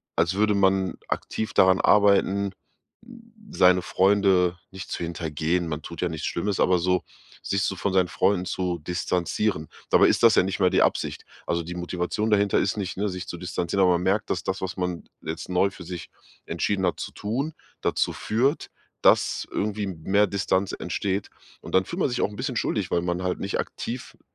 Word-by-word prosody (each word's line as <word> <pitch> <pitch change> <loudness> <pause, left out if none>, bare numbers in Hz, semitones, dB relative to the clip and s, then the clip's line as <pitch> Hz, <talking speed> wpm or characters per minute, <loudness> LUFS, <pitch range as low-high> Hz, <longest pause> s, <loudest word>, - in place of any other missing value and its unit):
als 85 +3 +2
würde 105 +1 +2
man 95 -1 +2
aktiv 110 0 -3
daran 95 0 +5
arbeiten, 100 -1 +4 0.5
hm, 230 -1 -15 0.2
seine 90 0 +5
Freunde 95 -2 +3
nicht 95 -1 -9
zu - - -3
hintergehen, 85 +1 -1
man 75 -1 -4
tut 85 +1 -8
ja 90 - +1
nichts 80 -1 -4
Schlimmes, 100 +3 -2
aber 90 -1 +4
so 90 +1 +1 0.4
sich 100 0 0
so 95 - 0
von 95 +2 -1
seinen 95 -1 +3
Freunden 95 0 +1
zu 90 -2 -2
distanzieren. 90 +1 -1 0.2
Dabei - - +6
ist - - +1
das 115 -2 +8
ja - - +5
nicht 95 +1 -3
mal 95 -2 +4
die - - +3
Absicht. - - 0 0.2
Also, 85 0 0
die 90 +2 -7
Motivation 90 +4 -2
dahinter 100 -1 +3
ist 100 - 0
nicht, 95 -3 -4
ne, 105 +2 0
sich 90 -1 -6
zu 85 - -6
distanzieren, 90 +2 -1
aber 90 -1 +5
man 85 - 0
merkt, 100 +3 +1
dass - - -1
das, 95 0 -2
was 95 -2 -3
man 90 -2 -3 0.2
jetzt 80 +1 -5
neu 90 +2 +3
für 95 - -11
sich 90 0 -7 0.4
entschieden 100 -2 -1
hat 90 - -1
zu - - -5
tun, 130 +10 -3 0.3
dazu - - +1
führt, 130 +8 0 0.3
dass - - +3
irgendwie 105 0 -2
m 90 -5 -7
mehr 100 +4 +3
Distanz 95 -1 0
entsteht. 100 0 -2 0.3
Und - - -4
dann 95 0 +4
fühlt 175 - -5
man 160 - +2
sich 125 - -2
auch - - +2
'n 105 - -11
bisschen - - -3
schuldig, - - -1
weil 85 - +2
man 90 0 -1
halt 90 -1 -1
nicht 100 - -2
aktiv, 120 +1 -5
m - - -34
95 Hz, 200 wpm, -25 LUFS, 90-100 Hz, 0.5 s, das